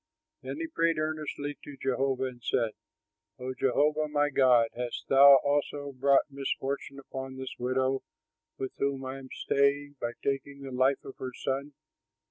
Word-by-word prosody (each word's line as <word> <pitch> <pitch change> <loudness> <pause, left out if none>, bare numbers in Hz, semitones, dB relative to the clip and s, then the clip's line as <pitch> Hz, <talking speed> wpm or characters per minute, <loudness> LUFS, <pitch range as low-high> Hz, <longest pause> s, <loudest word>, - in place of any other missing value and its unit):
Then - - -5
he 330 - -2
prayed 165 - +1
earnestly 155 -2 -3
to 145 -1 -10
Jehovah 135 0 0
and 125 -2 -5
said, 115 -3 +1 0.7
"O 130 0 -4
Jehovah, 150 +4 +2
my 145 0 +1
God, 125 -4 +5
hast 125 0 -4
thou 140 +1 +9
also 145 0 0
brought 135 +1 +4
misfortune 140 0 -3
upon 135 -1 -7
this 130 -1 -5
widow, 130 +2 +1 0.6
with 130 - -3
whom 140 -1 -1
I 130 +1 -5
am 130 -1 -11
staying, 140 +1 +1
by 120 0 -2
taking 140 0 -2
the 135 - -6
life 130 +2 +2
of 135 - -9
her 130 -1 -5
son?" 140 +2 -3
135 Hz, 155 wpm, -29 LUFS, 130-145 Hz, 0.7 s, thou